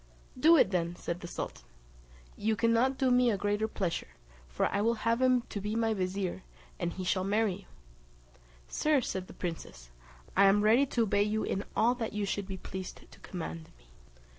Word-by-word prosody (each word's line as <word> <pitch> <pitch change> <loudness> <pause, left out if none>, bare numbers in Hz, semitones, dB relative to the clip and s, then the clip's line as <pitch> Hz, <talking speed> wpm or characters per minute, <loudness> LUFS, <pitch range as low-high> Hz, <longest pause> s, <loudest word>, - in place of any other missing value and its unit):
"Do 325 +6 +6
it 200 - +4
then," 170 -2 -1
said 170 0 -4
the 175 - -7
sultan, - - -6 0.7
"you 220 +1 0
cannot 230 +4 +2
do 260 -2 +2
me 250 0 +4
a 210 - +1
greater 205 +2 0
pleasure; 185 -5 -2 0.4
for - - -1
I 200 - 0
will 230 +2 +2
have 230 +2 +2
him 255 -1 +4
to 205 - -4
be 210 +2 -3
my 225 -1 +1
vizier, 185 - -2 0.4
and 170 - -1
he 185 - -6
shall 185 +1 +1
marry 205 +1 +1
you." - - -11 1.0
"Sir," 300 - +2
said 190 -5 -4
the - - -12
princess, 65 - -6 0.4
"I 200 - +6
am 200 +1 +5
ready 235 +6 +5
to 235 -3 +1
obey 200 -1 +2
you 215 +1 0
in 195 - -2
all 235 +2 +4
that 235 -4 -4
you 210 -1 -1
should 200 0 -3
be 190 -1 -5
pleased 185 0 -8
to - - -16
command 80 0 -6
me." - - -25
205 Hz, 195 wpm, -31 LUFS, 185-230 Hz, 1.0 s, Do